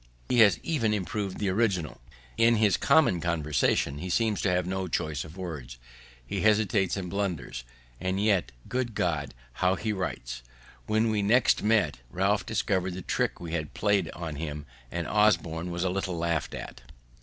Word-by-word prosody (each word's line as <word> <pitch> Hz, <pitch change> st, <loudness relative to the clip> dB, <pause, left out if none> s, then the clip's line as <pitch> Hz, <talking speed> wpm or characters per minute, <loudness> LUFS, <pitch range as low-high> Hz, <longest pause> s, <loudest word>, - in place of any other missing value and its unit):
He 125 Hz, -, +3 dB
has 105 Hz, -6 st, +7 dB
even 115 Hz, -10 st, +1 dB
improv'd 100 Hz, 0 st, -2 dB
the 100 Hz, -, 0 dB
original. 95 Hz, -, 0 dB, 0.3 s
In 115 Hz, +1 st, +5 dB
his 105 Hz, -4 st, +3 dB
common 125 Hz, -, +4 dB
conversation 75 Hz, -4 st, +1 dB
he 90 Hz, -, -5 dB
seems 110 Hz, +3 st, +1 dB
to 100 Hz, -, +1 dB
have 90 Hz, -1 st, +1 dB
no 95 Hz, 0 st, -2 dB
choice 75 Hz, -5 st, -2 dB
of 80 Hz, +3 st, -12 dB
words; 75 Hz, -10 st, -6 dB, 0.5 s
he -, -, -3 dB
hesitates 105 Hz, -3 st, +2 dB
and 95 Hz, -2 st, -4 dB
blunders; 90 Hz, -10 st, -3 dB, 0.4 s
and 95 Hz, +1 st, -1 dB
yet, 100 Hz, -3 st, +2 dB, 0.2 s
good 125 Hz, -3 st, -2 dB
God! 75 Hz, -9 st, -1 dB, 0.3 s
how 90 Hz, +1 st, +4 dB
he 110 Hz, +2 st, -2 dB
writes!" 60 Hz, -10 st, -4 dB, 0.5 s
When 110 Hz, +1 st, +2 dB
we 105 Hz, -1 st, +1 dB
next 115 Hz, +5 st, +4 dB
met, 105 Hz, -, +2 dB
Ralph 95 Hz, +5 st, 0 dB
discovered 95 Hz, -4 st, 0 dB
the 95 Hz, -, -6 dB
trick -, -, -1 dB
we 85 Hz, -2 st, -6 dB
had 80 Hz, -3 st, -3 dB
plaid 100 Hz, -5 st, +2 dB
him, 75 Hz, -3 st, -5 dB, 0.2 s
and 85 Hz, +3 st, -3 dB
Osborne 85 Hz, -5 st, +2 dB
was 85 Hz, 0 st, -2 dB
a 95 Hz, -, +1 dB
little 95 Hz, -2 st, -2 dB
laughed 85 Hz, -2 st, -1 dB
at. -, -, -8 dB
95 Hz, 165 wpm, -28 LUFS, 80-105 Hz, 0.5 s, has